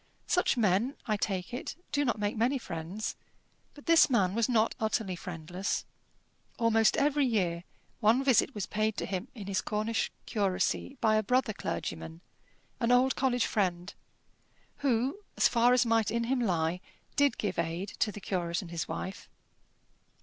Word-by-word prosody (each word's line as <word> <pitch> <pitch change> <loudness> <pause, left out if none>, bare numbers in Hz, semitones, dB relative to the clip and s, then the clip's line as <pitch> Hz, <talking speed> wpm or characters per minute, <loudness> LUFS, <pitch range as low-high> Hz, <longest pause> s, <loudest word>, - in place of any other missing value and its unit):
Such 360 -7 +2
men, 220 +5 +2
I 215 - +1
take 195 -1 -2
it, 245 - -4 0.2
do 290 - +1
not 240 -4 0
make 205 0 -1
many 240 +5 +2
friends. 175 -1 -5 0.6
But 290 - -14
this 330 -2 +6
man 195 -7 +2
was 230 +2 +1
not 225 -2 +3
utterly 215 -3 -1
friendless. 180 +2 -4 0.7
Almost 225 -1 +3
every 290 -1 +3
year 180 -7 0 0.3
one 230 +5 +4
visit 265 -1 +3
was 205 - -2
paid 215 0 -1
to - - -2
him 190 -2 -3
in 210 -4 -7
his 195 -1 -1
Cornish 215 +2 -1
curacy 205 +6 -1
by 215 -1 +4
a - - +3
brother 250 +1 +1
clergyman, 80 - -5 0.6
an 235 - +1
old 255 +2 +4
college 250 -2 +1
friend, 180 -3 -1 0.8
who, 260 - +1 0.2
as - - +5
far 240 +1 +4
as 250 0 +4
might 225 -2 +2
in 235 +1 0
him 255 +2 0
lie, 175 -5 0 0.3
did 285 -1 +3
give 200 -5 -2
aid 170 +4 -2
to 210 - +2
the 205 - -8
curate 175 -2 -2
and 170 - -10
his 170 -1 -3
wife. 190 - -6
215 Hz, 165 wpm, -30 LUFS, 185-245 Hz, 0.8 s, this